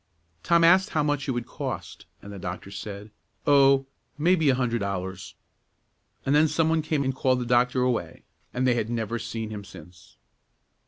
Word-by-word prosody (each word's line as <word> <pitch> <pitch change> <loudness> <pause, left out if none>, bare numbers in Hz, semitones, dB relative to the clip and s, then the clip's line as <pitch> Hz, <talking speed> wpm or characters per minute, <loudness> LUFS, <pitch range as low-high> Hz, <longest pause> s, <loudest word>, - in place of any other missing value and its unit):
Tom 170 - +3
asked 185 +3 +5
how 155 - 0
much 145 -1 -1
it - - 0
would 120 -1 -3
cost, - - -6 0.2
and 100 - -9
the 100 - -8
doctor 90 +1 -6
said, 100 +1 -8 0.3
"Oh, 135 -1 +5 0.3
maybe 160 -1 +3
a 130 - +4
hundred 120 -2 0
dollars;" 95 -2 -5 0.9
and 135 - +2
then 150 +2 +5
some 160 +1 +1
one 160 0 +2
came 155 -2 -1
and 135 0 -1
called 130 -1 +1
the 125 - -3
doctor 125 +1 +2
away, 125 -2 -2 0.3
and 130 +1 -1
they 125 - +4
had 115 -2 -2
never 115 0 -2
seen 110 -1 -5
him 105 -1 -6
since. 90 -2 -15
125 Hz, 180 wpm, -26 LUFS, 105-145 Hz, 0.9 s, asked